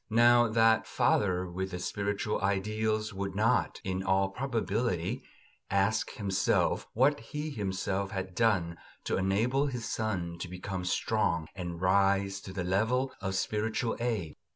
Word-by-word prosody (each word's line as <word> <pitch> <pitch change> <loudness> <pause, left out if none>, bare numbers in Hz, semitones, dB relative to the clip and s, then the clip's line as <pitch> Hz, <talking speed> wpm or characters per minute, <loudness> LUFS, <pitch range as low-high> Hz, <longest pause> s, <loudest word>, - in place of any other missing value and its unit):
Now 120 +1 +6
that 115 0 +3
father 90 -2 +1
with 95 +2 -4
the 90 - -5
spiritual 100 +3 -2
ideals 105 +2 0
would 100 0 -4
not, 115 +4 +2
in 95 0 -2
all 95 0 +2
probability, 115 -5 -1 0.5
ask 110 +4 +1
himself 100 -2 +1
what 140 +5 +3
he 150 +7 -5
himself 100 -3 -2
had 95 -2 -4
done 90 -7 +1 0.2
to - - -1
enable 115 +9 +1
his 125 -4 -4
son 90 -6 -2
to 90 - -4
become 90 +1 -5
strong 85 -4 0
and 85 -3 -5
rise 95 +1 +2
to 95 - -8
the 95 -1 -3
level 115 +8 +1
of 95 -2 -2
spiritual 110 +4 -1
aid. 110 -10 -2
100 Hz, 140 wpm, -30 LUFS, 95-115 Hz, 0.5 s, Now